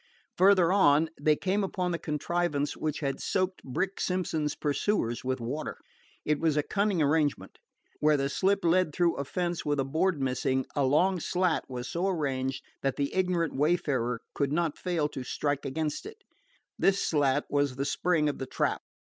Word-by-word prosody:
Farther 185 -2 +5
on 160 -5 +4
they 150 +1 +4
came 195 +5 0
upon 185 -2 -2
the 170 - -2
contrivance 150 -1 -1
which 155 0 -3
had 140 -2 -2
soaked 185 -1 -1
Brick 190 +9 -2
Simpson's 160 -5 -1
pursuers 145 - -1
with 130 0 -1
water. 130 +7 -4 0.5
It 150 -1 +1
was 160 -2 +1
a 150 - +2
cunning 200 -4 +1
arrangement. 145 0 0 0.4
Where 150 0 +4
the 135 0 0
slip 195 +6 +1
led 170 -2 +2
through 175 -1 +2
a 140 - -1
fence 175 +3 -2
with 145 -1 0
a 135 - +1
board 160 +4 +1
missing, 130 0 0
a 140 -2 +2
long 175 +7 +3
slat 180 0 0
was 125 -1 -5
so 175 +3 -1
arranged 135 -7 -1 0.2
that 135 -1 0
the 140 -1 -2
ignorant 180 -4 0
wayfarer 135 -6 0
could 140 -1 0
not 165 -1 0
fail 170 -5 -1
to 130 - -6
strike 145 +2 -2
against 150 - -3
it. 435 +1 -12 0.6
This 195 0 +3
slat 145 -2 +2
was 145 -2 0
the 135 +1 -2
spring 160 +1 +1
of 145 - -2
the 130 - -4
trap. - - -1
150 Hz, 175 wpm, -29 LUFS, 140-180 Hz, 0.6 s, Farther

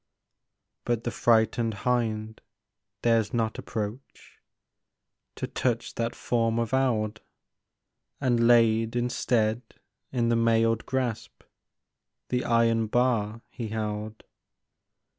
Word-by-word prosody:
But 120 -1 -1
the 120 - -2
frightened 115 -1 +2
hind 110 -3 -1 0.6
dares 115 -2 +2
not 110 -1 -1
approach 110 +4 -7 1.0
To - - -3
touch 120 -2 -2
that 115 0 -2
form 115 -1 0
of 115 0 -1
eld, 110 -5 +1 1.0
And 120 -4 +2
laid 115 -1 +4
instead 120 -2 +1 0.5
in 120 -3 +1
the 120 - +3
mailed 115 -1 +2
grasp 120 -4 -3 0.9
The 125 0 0
iron 115 -1 +2
bar 115 -2 +1
he 115 - -5
held. 110 0 -4
115 Hz, 100 wpm, -27 LUFS, 110-120 Hz, 1.0 s, laid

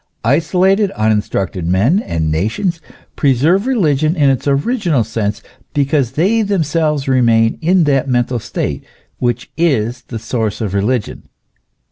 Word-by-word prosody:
Isolated, 185 - +2
uninstructed 105 -5 -1
men 105 - +2
and 80 - -2
nations 115 - -1 0.3
preserve 155 - +2
religion 155 - +1
in 145 -5 +3
its 135 +1 -2
original 155 - +1
sense, 105 -1 -3 0.3
because 140 -3 +1
they 195 +10 +2
themselves 160 -7 0
remain 115 -4 +2
in 180 +2 +3
that 140 -2 +1
mental 120 0 0
state - - -4 0.4
which 120 -1 -2
is 125 -8 0
the 115 - -5
source 110 -1 -3
of 105 -5 -3
religion. 105 +3 -2
135 Hz, 125 wpm, -16 LUFS, 115-165 Hz, 0.4 s, in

